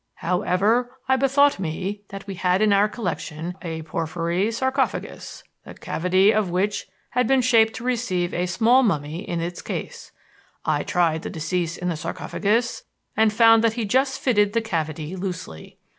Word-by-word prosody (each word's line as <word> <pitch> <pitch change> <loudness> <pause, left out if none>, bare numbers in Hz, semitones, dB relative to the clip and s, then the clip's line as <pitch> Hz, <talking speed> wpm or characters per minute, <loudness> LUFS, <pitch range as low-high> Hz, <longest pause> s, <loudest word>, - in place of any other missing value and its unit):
However, 205 +8 0
I 265 - +4
bethought 275 -1 +3
me 190 +4 -3
that 195 0 -8
we 200 - -5
had 185 +2 +1
in 210 -1 +4
our 200 +1 +4
collection 175 -7 -4
a 160 -2 -5
porphyry 170 +5 -1
sarcophagus, 260 +3 -2 0.2
the - - -11
cavity 185 +4 +2
of 215 -4 +1
which 195 +4 -1 0.2
had 250 -1 +1
been 270 0 +4
shaped 225 -2 +4
to - - -7
receive 225 -8 -1
a 180 +1 -1
small 230 +8 +4
mummy 160 - -1
in 170 -3 -3
its 175 +1 -4
case. - - -6 0.5
I 150 -2 +1
tried 165 -3 +1
the - - -5
deceased 170 +1 -2
in 180 - -2
the 170 - -1
sarcophagus 220 +8 -1 0.3
and 220 0 +4
found 225 +1 +6
that 225 -1 +3
he 230 -1 -2
just 265 +5 +1
fitted 210 -5 +2
the 230 - +2
cavity 160 -5 -3
loosely. 180 - -6
195 Hz, 165 wpm, -23 LUFS, 175-230 Hz, 0.5 s, found